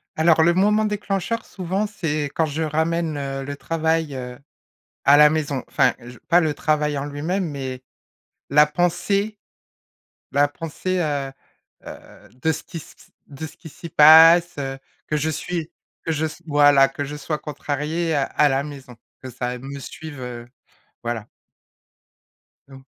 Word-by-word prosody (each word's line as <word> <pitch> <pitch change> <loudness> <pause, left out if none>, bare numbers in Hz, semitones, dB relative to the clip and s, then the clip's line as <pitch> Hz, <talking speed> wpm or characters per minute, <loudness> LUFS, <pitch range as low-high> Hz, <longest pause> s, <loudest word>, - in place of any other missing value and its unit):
Alors, 160 0 +4
le 170 +2 +4
moment 210 +3 +3
déclencheur, 210 +1 -2
souvent, 190 +2 -2
c'est 155 -8 -2
quand 160 - +1
je 155 +2 -3
ramène, 160 0 -1
heu, 135 -1 -4
le 145 +1 -5
travail, 160 -1 -1
heu, 125 0 -7 0.7
à 140 +1 +7
la 150 0 +7
maison, 150 -4 -2
enfin, - - +2
je 120 +1 -12
pas 175 0 +5
le 155 -3 0
travail 150 -1 0
en 140 - -3
lui-même, 160 +7 -2
mais, 130 -3 -6 0.7
la 150 +1 +6
pensée 195 +6 0 1.0
la 145 +1 +4
pensée, 165 +5 -4
heu 145 -4 -2 0.5
heu, - - -12
de 160 - +2
ce 155 - -6
qui 170 - -11
s 160 - -9
q - - -27
s - - -37
de 145 +2 -7
ce 160 - -14
qui 165 - -12
s'y 170 +4 -10
passe, 165 +2 +7
heu, 135 -1 -4 0.3
que 150 - 0
je 155 +2 0
suis 165 +1 -4 0.3
que 165 - -1
je 160 +1 0
s 160 +2 -9
voilà, 145 -2 +5
que 145 +1 -5
je 145 +2 -6
sois 150 +1 -3
contrariée, 150 +3 -3
heu, 140 -2 +1
à 150 - +5
la 135 0 +1
maison, 135 -4 -10 0.3
que 130 - -7
ça 125 0 -4
me 135 +3 -8
suive, 145 +1 -9
heu, 120 -1 -7 0.6
voilà. 115 -2 -4 1.4
Donc 135 -1 -14
150 Hz, 165 wpm, -22 LUFS, 140-165 Hz, 1.4 s, à